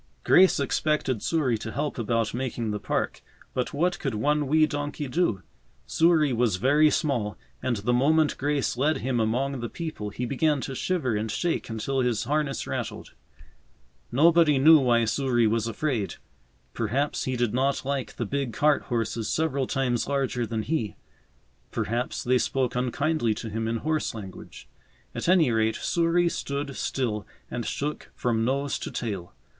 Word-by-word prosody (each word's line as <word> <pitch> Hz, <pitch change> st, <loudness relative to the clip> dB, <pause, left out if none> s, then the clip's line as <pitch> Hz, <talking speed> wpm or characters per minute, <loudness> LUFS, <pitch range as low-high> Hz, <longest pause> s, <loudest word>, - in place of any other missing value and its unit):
Grace 185 Hz, -3 st, +5 dB
expected 140 Hz, -4 st, 0 dB
Souris 135 Hz, -9 st, +1 dB
to 110 Hz, -, -5 dB
help 145 Hz, 0 st, -3 dB
about 115 Hz, -1 st, 0 dB
making 120 Hz, -3 st, -2 dB
the 105 Hz, -, -3 dB
park, -, -, -2 dB, 0.3 s
but 125 Hz, -, -1 dB
what 175 Hz, +4 st, 0 dB
could 135 Hz, -6 st, -2 dB
one 145 Hz, +6 st, +1 dB
wee 155 Hz, +2 st, +4 dB
donkey 145 Hz, -1 st, -4 dB
do? 125 Hz, -, 0 dB, 0.4 s
Souris 160 Hz, -4 st, +3 dB
was 115 Hz, -4 st, +2 dB
very 145 Hz, +10 st, +4 dB
small, 120 Hz, -, -1 dB, 0.2 s
and 125 Hz, -, 0 dB
the 110 Hz, +4 st, 0 dB
moment 150 Hz, +5 st, +3 dB
Grace 145 Hz, -2 st, 0 dB
led 145 Hz, +5 st, +1 dB
him 125 Hz, -2 st, -1 dB
among 125 Hz, +5 st, 0 dB
the 120 Hz, -1 st, -4 dB
people 155 Hz, -11 st, -5 dB
he 125 Hz, +5 st, -4 dB
began 145 Hz, +3 st, +1 dB
to 135 Hz, -, -4 dB
shiver 130 Hz, -5 st, -1 dB
and 110 Hz, +1 st, -2 dB
shake 170 Hz, +8 st, -1 dB
until 115 Hz, +5 st, -2 dB
his 125 Hz, -4 st, +1 dB
harness 145 Hz, +1 st, -1 dB
rattled. -, -, -5 dB, 1.0 s
Nobody 160 Hz, +2 st, +5 dB
knew 155 Hz, +4 st, +8 dB
why 120 Hz, -3 st, +3 dB
Souris 120 Hz, -1 st, +2 dB
was 115 Hz, 0 st, 0 dB
afraid. 115 Hz, -2 st, -2 dB, 0.6 s
Perhaps 125 Hz, +6 st, -1 dB
he 130 Hz, -, -1 dB
did 120 Hz, -3 st, 0 dB
not 135 Hz, +2 st, 0 dB
like 140 Hz, -1 st, -2 dB
the 120 Hz, -, -2 dB
big 135 Hz, +1 st, -2 dB
cart 150 Hz, -1 st, +3 dB
horses 115 Hz, -2 st, -2 dB
several 140 Hz, -5 st, 0 dB
times 125 Hz, -3 st, 0 dB
larger 135 Hz, -4 st, -1 dB
than 110 Hz, -1 st, -2 dB
he; 120 Hz, -9 st, -2 dB, 0.7 s
perhaps 120 Hz, +3 st, -2 dB
they 125 Hz, +1 st, +3 dB
spoke 130 Hz, -1 st, 0 dB
unkindly 125 Hz, -1 st, 0 dB
to 110 Hz, +1 st, -6 dB
him 110 Hz, +1 st, -2 dB
in 115 Hz, +1 st, 0 dB
horse 155 Hz, 0 st, -1 dB
language; 95 Hz, -4 st, -10 dB, 0.5 s
at -, -, -2 dB
any 170 Hz, -8 st, +5 dB
rate, 110 Hz, 0 st, +1 dB
Souris 170 Hz, 0 st, +1 dB
stood 140 Hz, -1 st, -4 dB
still 110 Hz, -6 st, -2 dB, 0.2 s
and 120 Hz, -2 st, -3 dB
shook 150 Hz, +2 st, -3 dB
from 115 Hz, -2 st, 0 dB
nose 140 Hz, +3 st, 0 dB
to -, -, -5 dB
tail. 95 Hz, -, -5 dB
130 Hz, 160 wpm, -26 LUFS, 115-150 Hz, 1.0 s, knew